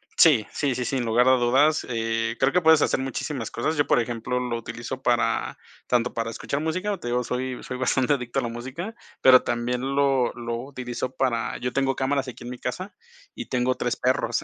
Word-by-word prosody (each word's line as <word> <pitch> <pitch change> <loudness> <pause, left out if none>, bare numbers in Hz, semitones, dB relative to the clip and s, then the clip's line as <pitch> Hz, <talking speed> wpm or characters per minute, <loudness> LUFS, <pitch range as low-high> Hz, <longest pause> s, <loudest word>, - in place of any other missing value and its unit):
Sí, 135 -10 +5
sí, 140 -3 0
sí, 125 - -2
sin 130 -1 -1
lugar 120 +2 +3
a - - +7
dudas, 135 +6 +3
eh, 115 -1 -1
creo 135 +1 +3
que 180 - +2
puedes 160 -2 +6
hacer - - +2
muchísimas 130 -2 -4
cosas. 155 +7 -1
Yo, 145 - +3
por - - +3
ejemplo, 120 +1 -2
lo 125 -2 -2
utilizo 120 +3 -6
para 120 -1 +1 0.3
tanto 125 0 +1
para 115 0 -2
escuchar 140 +5 -3
música, 185 +6 -2
te 120 - -6
digo, 125 +1 +1
soy 125 +1 -3
soy 125 - -5
bastante 130 +1 +2
adicto 125 -4 -2
a - - -1
la - - -1
música, 130 - -6 0.3
pero 130 -1 +7
también 120 +1 -1
lo 135 -3 +2
lo 120 -1 -4
utilizo 130 -1 -5
para 120 -3 0
yo 125 - -2
tengo 135 -1 +1
cámaras 135 +1 0
aquí, 125 -1 -9
en 120 - -6
mi 125 - -6
casa, 180 +12 -5 0.4
y 255 - -5
tengo 125 0 0
3 - - -1
perros. - - 0
125 Hz, 210 wpm, -25 LUFS, 120-135 Hz, 0.4 s, a